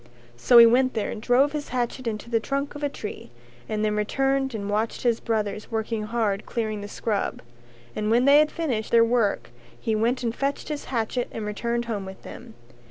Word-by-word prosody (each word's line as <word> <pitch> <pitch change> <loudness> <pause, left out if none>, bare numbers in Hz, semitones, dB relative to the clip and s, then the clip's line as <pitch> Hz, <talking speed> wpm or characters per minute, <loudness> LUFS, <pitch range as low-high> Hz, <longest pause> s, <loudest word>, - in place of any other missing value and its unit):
So 240 - +5
he 235 - +11
went 255 +3 +3
there 215 - -1
and 215 - -6
drove 255 +5 +3
his 295 -1 -4
hatchet 250 0 -2
into 215 0 -4
the 230 -1 +1
trunk 275 +5 -3
of 290 - -8
a 290 - 0
tree 210 - -7 0.4
and 215 0 0
then 210 0 0
returned 270 +4 0
and 200 -2 -4
watched 215 +2 -1
his 235 -2 +2
brothers 215 -2 -2
working 220 -1 -2
hard 215 -3 -1
clearing 215 -3 -2
the 205 - -6
scrub, 205 0 -2 0.5
and 210 0 -1
when 240 +3 +4
they 285 +1 +7
had 305 0 +4
finished 255 -10 -2
their 230 -1 +5
work 230 - 0 0.3
he 225 - -1
went 235 +4 0
and 230 -1 -1
fetched 280 +2 -2
his 300 -1 -4
hatchet 240 0 -2
and 220 - -5
returned 235 +3 -2
home 210 -4 -3
with 190 0 -10
them. 235 -2 -11
230 Hz, 205 wpm, -25 LUFS, 215-255 Hz, 0.5 s, he